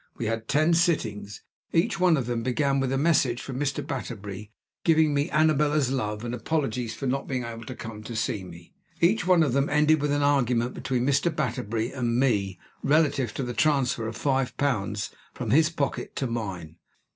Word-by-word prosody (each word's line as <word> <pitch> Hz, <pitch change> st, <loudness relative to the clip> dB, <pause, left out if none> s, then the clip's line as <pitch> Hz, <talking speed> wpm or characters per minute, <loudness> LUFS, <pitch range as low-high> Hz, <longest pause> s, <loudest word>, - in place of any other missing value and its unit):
We 115 Hz, -, -3 dB
had 115 Hz, 0 st, -2 dB
ten 155 Hz, +4 st, +3 dB
sittings. 110 Hz, -, 0 dB, 0.3 s
Each 195 Hz, +5 st, +1 dB
one 180 Hz, -3 st, +4 dB
of 130 Hz, -, -1 dB
them 120 Hz, -1 st, -2 dB
began 135 Hz, +3 st, +1 dB
with 135 Hz, -1 st, 0 dB
a 135 Hz, -, +1 dB
message 135 Hz, -5 st, +2 dB
from 130 Hz, -1 st, -6 dB
Mr. 145 Hz, 0 st, -1 dB
Batterbury, 105 Hz, -7 st, -6 dB, 0.3 s
giving 160 Hz, -2 st, +4 dB
me 145 Hz, +1 st, 0 dB
Annabella's 150 Hz, -2 st, +2 dB
love 105 Hz, -4 st, -2 dB
and 120 Hz, -, -3 dB
apologies 125 Hz, -3 st, -2 dB
for 135 Hz, -, -5 dB
not 135 Hz, +1 st, -1 dB
being 130 Hz, -2 st, -2 dB
able 115 Hz, -1 st, -7 dB
to 130 Hz, -, -7 dB
come 115 Hz, -, -7 dB
and 110 Hz, +2 st, -7 dB
see 110 Hz, -3 st, -1 dB
me. 85 Hz, -1 st, -12 dB, 0.3 s
Each 180 Hz, +2 st, +2 dB
one 180 Hz, -3 st, +5 dB
of 140 Hz, -6 st, 0 dB
them 140 Hz, +1 st, +1 dB
ended 150 Hz, +1 st, +3 dB
with 145 Hz, 0 st, 0 dB
an 145 Hz, 0 st, +1 dB
argument 125 Hz, -4 st, +2 dB
between 125 Hz, -2 st, -1 dB
Mr. 140 Hz, +4 st, +2 dB
Batterbury 120 Hz, -6 st, -2 dB
and 120 Hz, -2 st, -1 dB
me 100 Hz, -8 st, +1 dB, 0.2 s
relative 140 Hz, -5 st, +2 dB
to 135 Hz, -, -2 dB
the 125 Hz, -1 st, -4 dB
transfer 130 Hz, -6 st, +1 dB
of 110 Hz, 0 st, -6 dB
five 135 Hz, -3 st, 0 dB
pounds 105 Hz, -7 st, -1 dB, 0.2 s
from -, -, -3 dB
his 155 Hz, +3 st, +5 dB
pocket 145 Hz, -5 st, -3 dB
to 135 Hz, -, -1 dB
mine. 95 Hz, -9 st, -5 dB
130 Hz, 190 wpm, -26 LUFS, 115-150 Hz, 0.3 s, one